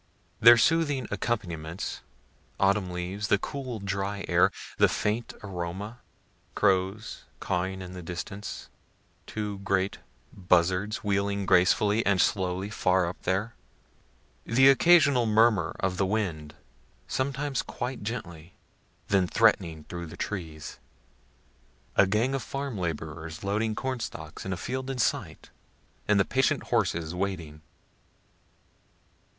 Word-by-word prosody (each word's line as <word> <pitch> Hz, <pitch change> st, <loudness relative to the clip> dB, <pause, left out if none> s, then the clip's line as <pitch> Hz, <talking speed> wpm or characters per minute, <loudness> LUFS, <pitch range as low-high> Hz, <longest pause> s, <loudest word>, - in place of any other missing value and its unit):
Their 120 Hz, +1 st, +9 dB
soothing 145 Hz, -2 st, +2 dB
accompaniments, 90 Hz, -6 st, -3 dB, 0.6 s
autumn 100 Hz, -1 st, +2 dB
leaves, 90 Hz, +4 st, -4 dB
the 105 Hz, -, +4 dB
cool 130 Hz, +1 st, -5 dB
dry 100 Hz, 0 st, -3 dB
air, -, -, +4 dB, 0.3 s
the -, -, +7 dB
faint 110 Hz, +3 st, -2 dB
aroma 95 Hz, +4 st, -5 dB, 0.6 s
crows 95 Hz, +2 st, 0 dB
cawing 95 Hz, +1 st, -2 dB
in 90 Hz, 0 st, -9 dB
the 90 Hz, -, -7 dB
distance 90 Hz, +4 st, -6 dB, 0.6 s
two 105 Hz, -2 st, -4 dB
great 95 Hz, 0 st, 0 dB, 0.3 s
buzzards 90 Hz, +3 st, +1 dB
wheeling 100 Hz, -1 st, 0 dB
gracefully 100 Hz, +4 st, +4 dB
and 100 Hz, -2 st, +2 dB
slowly 95 Hz, +1 st, 0 dB
far 90 Hz, -3 st, +2 dB
up 85 Hz, +1 st, -6 dB
there 100 Hz, +5 st, -1 dB, 0.9 s
the 130 Hz, +4 st, +5 dB
occasional 140 Hz, -4 st, +5 dB
murmur 110 Hz, 0 st, +3 dB
of 95 Hz, -1 st, -1 dB
the 95 Hz, -, +1 dB
wind, 85 Hz, -8 st, -2 dB, 0.5 s
sometimes 135 Hz, 0 st, -1 dB
quite 125 Hz, 0 st, -5 dB
gently, 90 Hz, -7 st, -6 dB, 0.5 s
then 95 Hz, -2 st, +3 dB
threatening 90 Hz, -8 st, +2 dB
through 85 Hz, +1 st, -7 dB
the 85 Hz, +3 st, -11 dB
trees 80 Hz, -7 st, -5 dB, 1.2 s
a 95 Hz, -, +5 dB
gang 115 Hz, +7 st, +1 dB
of 135 Hz, -, -1 dB
farm 135 Hz, 0 st, -4 dB
laborers 80 Hz, -2 st, -5 dB
loading 105 Hz, +2 st, 0 dB
cornstalks 115 Hz, -12 st, -5 dB
in -, -, -3 dB
a 90 Hz, -, -2 dB
field 130 Hz, +8 st, -4 dB
in 135 Hz, -, -3 dB
sight, 120 Hz, -, -2 dB, 0.6 s
and 105 Hz, -1 st, +4 dB
the 95 Hz, -, +4 dB
patient 135 Hz, 0 st, +1 dB
horses 80 Hz, -1 st, +1 dB
waiting. 90 Hz, -5 st, -4 dB
100 Hz, 120 wpm, -28 LUFS, 90-115 Hz, 1.2 s, Their